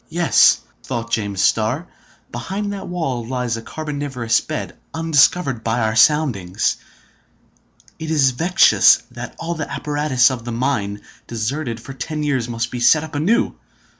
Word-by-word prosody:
"Yes," 170 +1 +4 0.2
thought 115 -2 -5
James 100 -3 -1
Starr, 120 +10 +1 0.4
"behind 205 +1 -4
that 200 - -7
wall 160 -9 -3
lies 125 -1 -2
a 115 - -6
carboniferous 140 -5 -2
bed, - - -5 0.2
undiscovered 155 -5 +2
by 115 +2 0
our 110 0 0
soundings. 120 - +2 1.2
It 160 - -5
is 145 -5 +3
vexatious 170 +9 +4
that - - -8
all 165 +1 -3
the 155 -3 -5
apparatus 145 -4 +1
of 125 -3 -5
the 120 - -5
mine, 115 -5 -2 0.3
deserted 120 +2 -3
for 135 +4 -9
ten 150 +3 -4
years, 130 -5 -1
must 115 0 -3
be 125 - -4
set 150 +6 +4
up 160 0 -9
anew. 165 +11 +1
135 Hz, 145 wpm, -20 LUFS, 115-155 Hz, 1.2 s, Yes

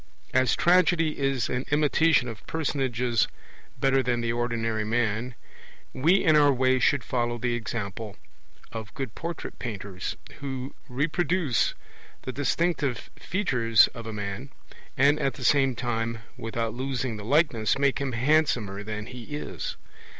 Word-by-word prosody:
As 130 -2 +3
Tragedy 175 -3 +3
is 135 -4 +1
an 125 +1 -2
imitation 150 -1 +3
of 115 -3 -8
personages 125 -6 0 0.5
better 135 0 +3
than 120 -1 0
the 115 0 0
ordinary 115 -2 -1
man, 115 +2 -1 0.6
we 165 +9 +3
in 160 -4 +5
our 145 -1 +6
way 130 0 +3
should 140 -1 +3
follow 120 -1 -1
the 120 +1 -1
example 110 -3 -4 0.6
of 110 -3 -6
good 135 -6 -4
portrait 170 -1 -6
painters, 100 -5 -5 0.2
who 135 -1 -5 0.2
reproduce 155 +1 +1 0.5
the 130 - -4
distinctive 145 0 -1
features 125 - +3
of 115 -2 -9
a - - -4
man, 105 +5 -5 0.5
and 145 +3 +4
at 135 - 0
the 130 - -8
same 135 -1 +4
time, 115 -1 -2 0.2
without 115 0 -3
losing 130 -2 -2
the 105 - -7
likeness, 120 -4 +2
make 140 -1 +2
him 135 -2 -2
handsomer 120 -6 +2
than 105 0 -5
he 125 +5 -8
is. 150 - -5
125 Hz, 140 wpm, -27 LUFS, 115-145 Hz, 0.6 s, our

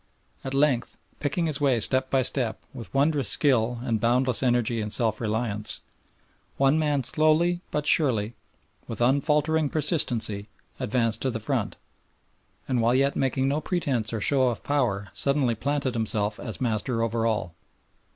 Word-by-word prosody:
At 135 0 -4
length, 135 -4 +1 0.2
picking 165 +4 -1
his 155 -2 -2
way 135 -4 +2
step 130 +4 +2
by 135 -1 +2
step 125 -3 0
with 120 -4 -8
wondrous 140 -4 +1
skill 120 -4 +2
and 115 -3 -1
boundless 125 +2 +2
energy 120 -3 +1
and 105 0 -4
self 110 -1 -1
reliance, 110 -1 -2 0.8
one 140 +3 +3
man 145 -3 0
slowly 155 +6 +2
but 150 -1 -2
surely, 120 -9 +2 0.5
with - - -6
unfaltering 150 +4 +2
persistency, 115 - 0 0.3
advanced 115 -1 0
to 135 - 0
the 115 -3 -3
front, 110 - -2 0.9
and 125 -3 0
while 120 +2 +2
yet 140 +1 +2
making 135 0 0
no 145 +3 0
pretence 135 - -1
or 115 - -3
show 130 +3 +3
of 120 - -3
power 115 -9 -1
suddenly 140 -4 +1
planted 135 +3 -2
himself 110 -2 -1
as 110 - -4
master 115 0 -1
over 115 0 0
all. 105 -6 -2
125 Hz, 150 wpm, -25 LUFS, 115-145 Hz, 0.9 s, one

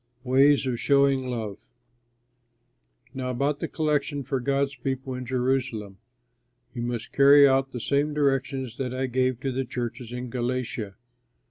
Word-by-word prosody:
WAYS 135 +2 +4
OF 125 -3 -2
SHOWING 140 -2 +3
LOVE 110 - -5 1.5
Now 130 -2 -4
about 140 +3 -1
the - - -2
collection 150 -2 -1
for 135 +1 -2
God's 140 +2 0
people 135 -1 -4
in 125 0 -6
Jerusalem, 125 -6 -1 0.7
you 120 - -5
must 120 -1 -4
carry 140 +1 +7
out 135 0 +2
the 125 - -5
same 140 +5 0
directions 135 -4 -1
that 130 -2 -3
I 130 +1 -1
gave 130 -1 0
to 135 - -1
the 130 +1 -1
churches 120 -1 -5
in 125 0 -5
Galatia. 120 -5 -3
130 Hz, 145 wpm, -26 LUFS, 125-140 Hz, 1.5 s, carry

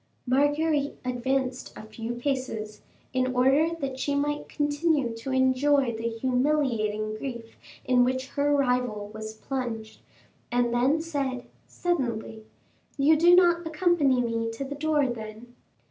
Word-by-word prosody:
Marguerite 290 +3 +1
advanced 255 +1 -1
a - - -8
few 225 +2 -6
paces, 240 -5 -3 0.3
in 255 0 0
order 270 +6 +4
that 270 -1 -3
she 285 +1 -1
might 295 +1 -1
continue 290 -3 0
to 230 +4 -7
enjoy 260 -1 +2
the 225 +1 -2
humiliating 230 -4 0
grief 235 -1 -7 0.3
in 250 -1 +4
which 260 +1 -1
her 290 0 0
rival 250 -7 0
was 220 0 -7
plunged, 225 -3 -5 0.5
and 245 -1 +1
then 265 +6 +2
said, 275 -6 -3 0.2
suddenly, 235 -10 -2 0.5
"You 295 +3 +5
do 345 +3 +6
not 345 -2 +4
accompany 310 -6 +2
me 230 -1 -1
to 225 +4 -5
the 275 +1 -5
door, 295 0 +1
then?" 230 0 -6
260 Hz, 130 wpm, -27 LUFS, 235-290 Hz, 0.5 s, do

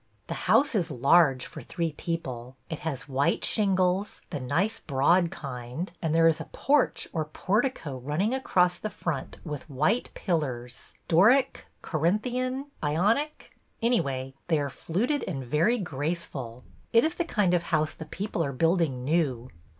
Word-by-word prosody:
The - - -4 0.2
house 285 -1 +5
is 180 -6 +1
large 140 0 +4
for - - -9
three 165 -2 -2
people. 130 -6 -5 0.2
It 160 - -3
has 145 -5 -4
white 140 0 +1
shingles, 190 -1 +1
the 150 - -3
nice 180 - 0
broad 165 +6 +3
kind, 140 -1 -6
and 160 -1 0
there 165 0 +6
is 160 - +2
a - - -5
porch 285 -1 +1
or 160 -3 -1
portico 185 - -1
running 155 - 0
across 180 -9 +2
the 215 - -3
front 155 -9 -4
with 150 -1 -6
white 155 - +1
pillars 130 - -3
— - - -42
Doric? 235 +11 +4 0.2
Corinthian? 250 - -1
Ionic? 210 - 0 0.2
Anyway, 135 - 0
they 165 -2 +3
are 140 -2 -2
fluted 235 - -1
and 135 -8 -4
very 160 - +2
graceful. 145 - -4 0.3
It 230 +4 +5
is 320 - 0
the 350 - -1
kind 205 - +1
of 175 - +3
house 155 -3 0
the 160 - -8
people 185 +2 -3
are 140 -2 -2
building 165 -3 +1
new. 135 -6 0
165 Hz, 155 wpm, -27 LUFS, 140-205 Hz, 0.3 s, there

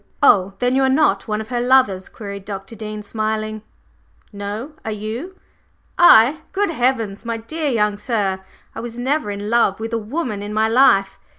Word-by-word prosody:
"Oh, 195 -7 +4
then 250 +1 +1
you 270 - +3
are 265 - +3
not 265 -8 +2
one 215 0 -1
of 220 - -9
her 245 -1 -1
lovers?" 245 -7 +3
queried 200 -2 -8
Dr. 195 +2 -7
Dean 215 -1 -6
smiling. 215 0 -3 0.7
"No; 205 +8 -6
are - - -4
you?" 220 - -5 0.6
"I? 290 -3 +6
Good 400 -2 0
heavens, 240 -8 -1
my 230 -1 -3
dear 300 +7 -3
young 210 -4 0
sir, 205 -5 -1 0.3
I - - -7
was 235 0 -7
never 265 0 -1
in 205 +1 -4
love 230 -4 +2
with 225 +1 -5
a 230 - +1
woman 225 -2 -4
in 205 +1 -5
my 220 0 +3
life! 220 -5 +3
220 Hz, 180 wpm, -20 LUFS, 205-255 Hz, 0.7 s, I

